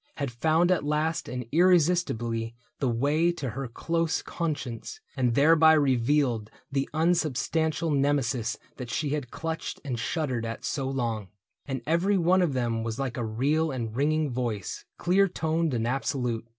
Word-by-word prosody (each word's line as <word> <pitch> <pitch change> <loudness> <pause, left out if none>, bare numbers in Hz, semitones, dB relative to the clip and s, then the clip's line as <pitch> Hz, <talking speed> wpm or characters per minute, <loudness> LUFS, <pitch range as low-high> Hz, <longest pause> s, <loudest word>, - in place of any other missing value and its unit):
Had 140 -4 -3
found 160 +8 +2
at 180 - +2
last 155 +2 -1
and 125 -1 -4
irresistibly 155 -10 +2 0.2
The 135 - +1
way 145 +8 +2
to 135 -8 -4
her 135 +3 -4
close 165 +7 -1
conscience, 150 - -4 0.2
and 125 -4 +1
thereby 160 +2 +6
Revealed 130 -5 +2 0.2
the 135 0 -1
unsubstantial 160 0 +1
Nemesis 135 -4 +1 0.2
That 125 -3 -6
she 150 +3 -1
had 145 -3 -2
clutched 160 +3 -4
and 125 -4 -3
shuddered 130 -3 -1
at 115 0 -5
so 135 -3 -2
long; 115 -6 -2 0.4
And 135 -3 -3
every 175 +6 +2
one 180 +2 +4
of 170 -6 +1
them 120 -3 0
was 115 0 -3
like 135 -3 -2
a 120 - -2
real 140 +9 +1
And 115 -5 -4
ringing 150 +2 +1
voice, 120 -6 -3
clear 190 +3 +3
toned 160 -2 0
and 115 -3 -1
absolute. 125 -2 -1
140 Hz, 155 wpm, -27 LUFS, 120-160 Hz, 0.4 s, thereby